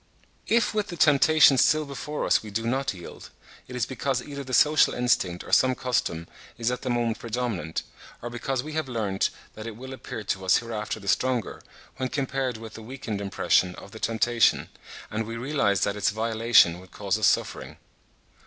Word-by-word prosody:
If 230 -1 +2
with 210 -1 -1
the 175 - -7
temptation 150 -2 +6
still 155 0 +4
before 145 +2 -4
us - - +3
we 110 - -9
do 115 +3 -3
not 135 +3 0
yield, 90 -3 -10 0.4
it 125 - -8
is 125 -4 0
because 130 -1 -2
either 140 +2 -7
the 130 - -9
social 150 +4 +4
instinct 95 -8 +1
or - - -11
some 130 -1 +4
custom 115 -10 -1 0.3
is 120 +1 0
at 125 - -3
the 130 - -3
moment 120 -2 0
predominant, 115 -9 -3 0.4
or 120 - -6
because 125 +1 -2
we 155 +1 -7
have 155 -3 -2
learnt 105 -5 0 0.2
that 110 +1 -8
it 115 - -6
will 130 +3 -8
appear 115 -4 -7
to 95 -1 -2
us 95 - +4
hereafter 110 -2 -4
the 100 - -12
stronger, 125 0 0 0.4
when 130 -1 -2
compared 135 -3 -2
with 110 -1 -10
the 115 - -9
weakened 110 -3 -5
impression 90 -2 +1
of 100 - -12
the 110 - -10
temptation, 115 +1 +2 0.4
and 110 0 -2
we 115 0 -5
realise 115 -7 +1
that 100 - +1
its 105 +1 +1
violation 110 -5 +3
would 95 0 -15
cause 105 +1 -2
us 110 - +4
suffering. - - -1
120 Hz, 190 wpm, -26 LUFS, 105-130 Hz, 0.4 s, temptation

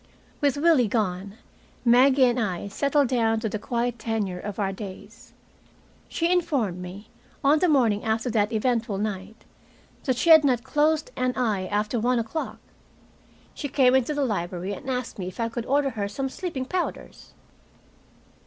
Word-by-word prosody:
With 285 -1 +2
Willie 295 -6 +4
gone, 200 -2 -2 0.5
Maggie 260 +3 +5
and 245 0 +1
I 200 -3 -2
settled 280 +5 +1
down 225 -3 +2
to 225 - -1
the 215 - -4
quiet 240 +1 -2
tenure 215 -5 -2
of 205 +1 -6
our 195 -2 0
days. 190 -1 -10 0.8
She 335 +1 0
informed 280 - 0
me, 190 +4 -9 0.3
on 290 +3 +4
the 360 - +2
morning 235 -8 +3
after 220 +2 -1
that 215 -1 +1
eventful 230 -2 0
night, 205 +1 -5 0.6
that 260 -3 +1
she 335 - +3
had 315 -1 +9
not 250 -4 +2
closed 300 +3 +1
an 255 0 -1
eye 210 -7 0
after 210 +4 -1
one 245 +3 +1
o'clock! 230 +8 -3 1.0
She 285 - -4
came 255 -2 +4
into 265 +3 +2
the 285 -1 +1
library 185 -3 -3
and 230 - -7
asked 250 -4 -3
me 180 - -4
if 185 - -9
I 230 0 0
could 235 0 -5
order 280 0 +2
her 205 -4 -3
some 270 +6 -3
sleeping 275 -4 -4
powders. 360 +5 -5
235 Hz, 165 wpm, -25 LUFS, 205-270 Hz, 1.0 s, had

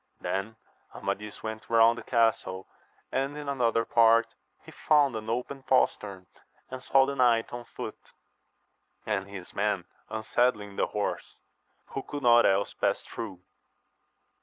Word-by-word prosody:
Then 95 +4 -3 0.4
Amadis 100 +1 -4
went 110 0 -6
round 115 0 +5
the 115 - -7
castle, 110 -5 0 0.4
and 140 +2 -1
in 150 -1 -7
another 115 -4 +1
part 115 0 +4 0.3
he - - -11
found 145 -5 +3
an 110 0 -5
open 125 +4 -3
postern, 100 -7 0 0.5
and 130 0 -6
saw 135 0 +4
the 140 - -3
knight 120 -4 +2
on 120 0 -6
foot, - - -7 1.1
and 100 -2 -1
his 95 -3 -9
men 100 -3 0 0.2
unsaddling 110 -2 0
the - - +1
horse, 105 -1 -4 0.5
who 135 - -4
could 145 +1 -7
not 120 -1 +6
else 100 +1 +1
pass - - 0
through. 90 -1 -7
115 Hz, 135 wpm, -28 LUFS, 105-125 Hz, 1.1 s, not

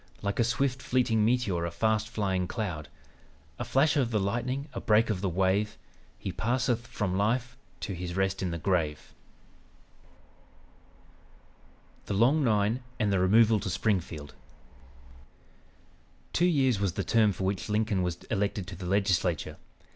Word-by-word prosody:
Like 100 +2 -2
a - - +5
swift 130 +3 0
fleeting 120 -4 +1
meteor, 110 -7 +1
a 85 - -1
fast 110 +4 0
flying 95 -5 -1
cloud, 90 - -4 0.7
A - - -1
flash 145 +3 +2
of 135 -5 +2
the 110 -2 +1
lightning, 120 +8 -2
a - - -5
break 110 +1 +3
of 95 -4 -2
the 100 - 0
wave, 95 +4 +1 0.4
He - - -4
passeth 120 0 -1
from 95 -4 -2
life 120 +4 0 0.3
to 100 - -3
his 90 -1 -5
rest 95 0 0
in 95 - -1
the 85 - -3
grave:'" 80 -3 -1 2.9
"THE 100 - -1
LONG 130 +9 +4
NINE" 110 +1 +2 0.2
AND 105 -3 +1
THE 95 - +2
REMOVAL 110 +4 +5
TO 100 - -4
SPRINGFIELD 90 -6 -2 2.0
Two 175 - +3
years 135 - +2
was 100 -4 0
the 100 - -2
term 110 -1 +3
for 95 0 -5
which 95 +2 -2
Lincoln 105 -2 +1
was 90 -1 -1
elected 100 -2 -1
to 95 - -7
the 90 0 -7
Legislature. 90 -4 0
105 Hz, 150 wpm, -29 LUFS, 95-115 Hz, 2.9 s, a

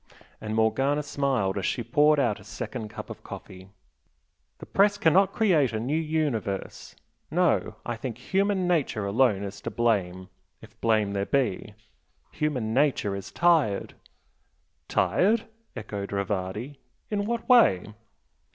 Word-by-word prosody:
and 110 0 -4
Morgana 135 +7 +1
smiled 130 -9 0
as 95 - -3
she 120 - -2
poured 150 +5 +3
out 120 -6 +1
a - - -14
second 110 -3 -6
cup - - -8
of - - -9
coffee 95 0 -10 0.9
"The - - -10
Press 200 +1 +3
cannot 190 +2 +4
create 165 - +2
a 110 - -1
new 125 +6 -2
universe. 150 -11 -2 0.3
No - - +1
I 120 -1 -3
think 115 0 -5
human 190 +6 0
nature 145 - 0
alone 100 -1 +2
is 100 0 -7
to - - -4
blame 95 -6 0 0.3
if - - -17
blame 110 -3 +2
there 100 0 -2
be. 110 -6 -1 0.6
Human 125 -8 -2
nature 130 -7 +1
is 100 - -7
tired." 160 - +2 0.9
"Tired?" 215 +4 +2 0.3
echoed 100 -1 -6
Rivardi 100 +6 -3 0.3
"In 205 -1 0
what 235 +1 -3
way?" 105 - +4
120 Hz, 135 wpm, -26 LUFS, 100-155 Hz, 0.9 s, cannot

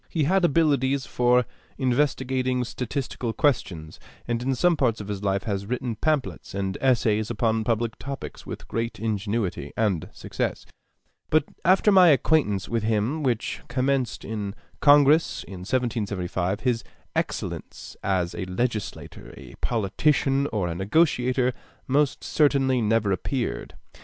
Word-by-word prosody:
He 160 - 0
had 185 +6 +2
abilities 140 -4 +2
for 125 0 +3 0.3
investigating 130 -1 +1
statistical 125 -1 -4
questions, 95 - -1 0.3
and 120 0 -1
in 130 +1 0
some 175 +6 +3
parts 120 -7 +1
of 105 -1 -7
his 100 -1 -4
life 100 0 0
has 100 -2 -3
written 125 -1 -2
pamphlets 145 -6 -2
and 95 -1 -2
essays 110 -5 +2
upon 115 -1 0
public 115 0 -1
topics 140 0 -7
with - - -8
great 115 -1 -3
ingenuity 105 -8 -2
and 100 -8 0
success; - - -4 0.6
but 155 -1 +4 0.2
after 190 +3 +4
my 185 -2 +7
acquaintance 140 - +3
with 115 -1 -1
him, 110 +8 0
which 125 -6 -1
commenced 130 -1 -1
in 105 -2 -4 0.2
Congress 145 +2 +5
in 95 -2 -9
1775, 100 -4 -2
his 120 -4 0 0.3
excellence - - -4
as 90 -3 0
a - - -4
legislator, 105 +4 -4
a - - -11
politician, 135 +6 +1
or 105 -8 -1
a 85 - -2
negotiator 125 - +2 0.3
most 140 +1 +1
certainly 135 -4 +2
never 110 -2 +2
appeared. 120 +6 -3
120 Hz, 130 wpm, -25 LUFS, 105-135 Hz, 0.6 s, my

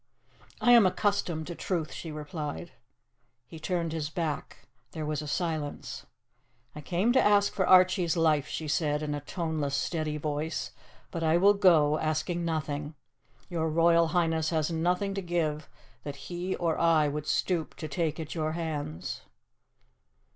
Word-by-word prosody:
"I 245 - +4
am 235 -5 +8
accustomed 180 -5 0
to 175 - -5
truth," 170 -2 -2
she 165 - -6
replied. 150 +2 -5 0.7
He 160 +6 -11
turned 170 -1 -2
his 155 -2 -2
back. 155 -2 -4 0.3
There 155 -1 -4
was 150 -1 -2
a 150 - -7
silence. 155 -3 -3 0.7
"I 150 - -7
came 185 +10 +1
to 260 - +5
ask 205 -1 +4
for 190 - 0
Archie's 185 -2 +5
life," 155 -3 +3
she 155 - -4
said, 150 -1 0
in 150 -1 -2
a 145 - -2
toneless, 155 -2 -2
steady 155 -2 -1
voice, 150 +1 -3 0.4
"but 165 - -4
I 160 +1 +3
will 200 +3 +6
go, 160 -7 +4
asking 160 +3 -1
nothing. 150 -2 -3 0.5
Your 165 -3 -1
Royal 165 +1 +4
Highness 160 -2 +1
has 160 -1 0
nothing 180 +4 0
to 195 - -3
give 160 -4 -2 0.3
that 145 -1 -6 0.2
he 175 +2 -2
or 165 -2 -1
I 165 -3 +4
would 150 +1 -4
stoop 175 -4 0
to 155 - -6
take 160 +1 -2
at 155 -1 -5
your 155 -2 -1
hands." 145 - -4
160 Hz, 155 wpm, -29 LUFS, 150-175 Hz, 0.7 s, am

